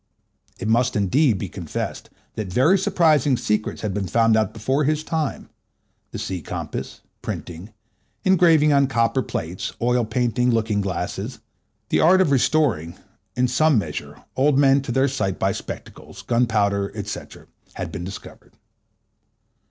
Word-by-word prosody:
It - - -5
must, 125 +3 +2
indeed, 110 - +2
be - - -4
confessed - - -5 0.2
that 105 -4 -5
very 130 - +4
surprising 155 -8 +3
secrets 105 -2 -2
had 105 -3 -2
been 100 -1 -2
found 115 +1 +3
out 110 0 +1
before 130 +7 0
his 155 +2 0
time—the 155 -3 -6
sea 95 -2 -4
compass, - - -6 0.2
printing, 90 +5 -6 0.5
engraving 165 -5 +5
on 140 -1 +4
copper 115 +1 +1
plates, 85 -5 -4
oil 120 +1 +2
painting, 120 +2 0
looking 110 -3 +1
glasses; 95 -2 -4 0.5
the - - +2
art 185 +4 +5
of 185 -6 +3
restoring, 125 - +1 0.4
in 125 0 +2
some 150 +2 +3
measure, 80 -8 -5
old 135 +1 +3
men 140 0 +5
to 135 - -5
their 130 +3 +2
sight 95 -9 -2
by - - +1
spectacles; - - -8
gunpowder, 105 -5 +1
&c., 105 - -4 0.5
had - - -5
been 85 - -5
discovered. 95 +2 -10
120 Hz, 140 wpm, -22 LUFS, 105-140 Hz, 0.5 s, engraving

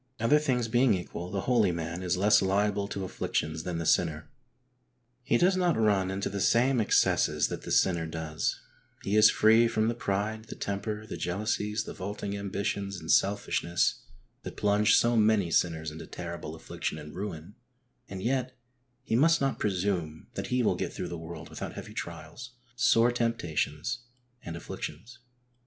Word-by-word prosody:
Other 115 +7 +4
things 125 -6 0
being 120 -1 +3
equal 90 -1 -6
the 95 0 -2
holy 115 -6 +3
man 85 +1 -4
is 90 0 0
less 105 +3 +5
liable 100 +1 +1
to 100 -1 -4
afflictions 80 -3 -2
than 85 +1 -4
the 85 - -3
sinner. 80 -2 +1 0.9
He 120 -1 +2
does 185 +7 +3
not 180 -3 +2
run 100 -4 +2
into 95 +1 -2
the 100 0 -3
same 120 +3 +3
excesses 105 - +2
that - - -5
the - - -7
sinner 85 -3 +2
does, 80 -1 -3 0.4
he 100 - 0
is 110 0 +8
free 115 +2 +5
from 110 -1 +1
the - - 0
pride, 110 0 -2
the - - -8
temper, 105 +2 -4
the - - -6
jealousies, 105 +3 -1
the - - -7
vaulting 100 +1 -5
ambitions, 100 -1 -3
and 80 - -3
selfishness, 95 -3 +1 0.4
that - - -8
plunge 105 +1 +4
so 120 0 +3
many 105 -5 +3
sinners 80 -2 +1
into 80 +2 -9
terrible 85 -2 -6
affliction 80 - -5
and 75 -1 -9
ruin, 95 -2 -6 0.6
and 95 -1 -6
yet 130 +1 -1 0.5
he - - -1
must 165 +6 +4
not 135 -1 0
presume 90 -5 -1
that - - -4
he 125 0 +1
will - - +3
get - - -3
through - - -5
the 85 - -5
world 80 -1 -8
without - - -6
heavy - - -8
trials, 125 +1 -7 0.2
sore 120 0 +4
temptations 115 - -1 0.4
and 85 - -7
afflictions. 120 +8 -7
100 Hz, 170 wpm, -29 LUFS, 85-115 Hz, 0.9 s, is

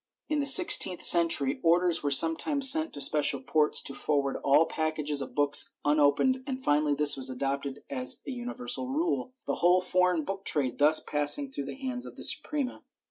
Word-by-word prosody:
In 305 -1 -2
the 280 - 0
sixteenth 270 - +6
century 165 -6 +5
orders 175 +1 0
were 145 - -3
sometimes 260 - +3
sent 315 +1 0
to 145 - -8
special 145 0 +1
ports 150 +3 -1
to 140 - -3
forward 140 -1 -3
all 140 +4 +1
pack 155 -1 -5
ages 145 -2 -3
of - - -10
books 145 0 +2
unopened 150 - 0
and 260 -2 -6
finally 150 - -1
this 150 0 +5
was 130 -1 -2
adopted 135 +1 -6
as 260 -2 -1
a - - -6
universal 250 +1 -6
rule, 280 -2 -4
the - - -4
whole 180 +1 +2
foreign 180 -2 -2
book 195 0 -7
trade 135 -9 -3
thus 155 +2 +3
passing 150 - -1
through 140 - -7
the - - -9
hands 255 -2 -7
of - - -14
the - - -9
Suprema. 285 -4 -4
165 Hz, 190 wpm, -26 LUFS, -, -, sixteenth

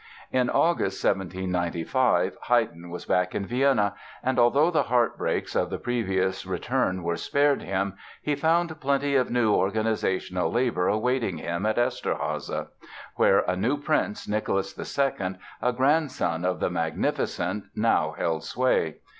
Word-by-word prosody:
In 125 -1 +2
August, 165 - +1
1795, 90 +2 0
Haydn 95 -8 +1
was 90 - -7
back 90 0 +1
in 100 - -1
Vienna, 120 -4 +2 0.3
and 130 0 +1
although 140 +8 +4
the 160 - +3
heart 120 -1 +2
breaks - - -2
of - - +1
the - - -3
previous 95 -6 -1
return 95 -1 -1
were 85 0 0
spared 145 0 +2
him 95 0 -2 0.3
he 150 - -1
found 160 +2 +1
plenty 140 0 +1
of 130 -2 +2
new 120 -3 +2
organizational 95 -3 0
labor 120 -7 +1
awaiting 110 -3 0
him 85 +6 -2
at 110 - 0
Eszterháza, 120 +1 -2 0.5
where - - +5
a 90 - -1
new 115 +10 0
prince, 145 -7 -1
Nicholas 100 -2 -1
II, 100 -9 -1 0.3
a 125 - +2
grandson 130 - +1
of 90 0 0
"The - - 0
Magnificent" 95 +3 -1
now - - +1
held 80 -1 -1
sway. 120 -11 +1
110 Hz, 140 wpm, -26 LUFS, 95-130 Hz, 0.5 s, where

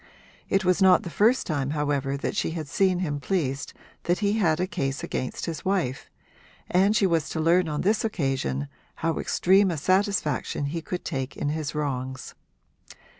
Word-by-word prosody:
It 195 0 +1
was 185 +2 +2
not 185 -1 +6
the 170 - -6
first 225 - +3
time 145 -4 -1
however 140 -2 0
that 140 - -3
she - - 0
had 155 -2 -4
seen 185 +3 +1
him 145 -5 -2
pleased 140 -6 -2 0.3
that 175 +1 +2
he 205 0 +1
had 175 -7 +2
a 180 - +1
case 140 -8 -3
against 130 - -3
his 165 -2 -5
wife, 180 -9 -1 0.6
and 195 +4 +4
she 210 - +3
was 165 -4 +1
to 160 - -3
learn 170 +2 +3
on 150 -1 -2
this 210 +3 +2
occasion 135 - -1 0.4
how 165 -1 +1
extreme 190 +2 +3
a 170 - -2
satisfaction 185 -4 0
he 165 +4 -3
could 180 +2 -5
take 135 -3 -4
in 145 - -1
his 155 -1 -3
wrongs. 130 -3 -3
165 Hz, 175 wpm, -26 LUFS, 140-185 Hz, 0.6 s, not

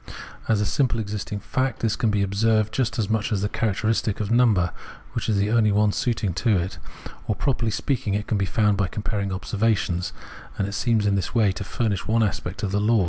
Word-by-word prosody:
As 110 -2 +3
a 105 - +1
simply 125 0 +1
existing 105 -1 -4
fact, 130 +2 -1
this 110 -1 +1
can 115 - +1
be 105 -1 +1
observed 110 +2 +1
just 120 -3 0
as 110 -4 0
much 110 +1 0
as 100 -2 0
the - - +2
characteristic 110 -1 0
of 105 -1 -2
number, 110 -8 +4 0.4
which - - -2
is 105 - +2
the 100 +2 +1
only 110 -2 +4
one 105 +1 +3
suited 110 -6 -1
to 105 +4 +3
it; 90 +2 -3 0.5
or 105 - +1
properly 120 -4 0
speaking 110 -2 -1
can 105 -1 -1
be 100 - +1
found 105 +1 +2
by 100 -2 +1
comparing 100 +1 -3
observations; 100 -2 0 0.5
and 100 - 0
it 100 - -5
seems 110 -1 +1
in 100 - +3
this 95 +3 -2
way 110 -4 +4
to 95 - -5
furnish 100 -1 -2
one 115 +1 +3
aspect 95 -1 -3
of 100 - -1
the 100 +1 +1
law. 110 +2 +3
105 Hz, 215 wpm, -24 LUFS, 100-115 Hz, 0.5 s, number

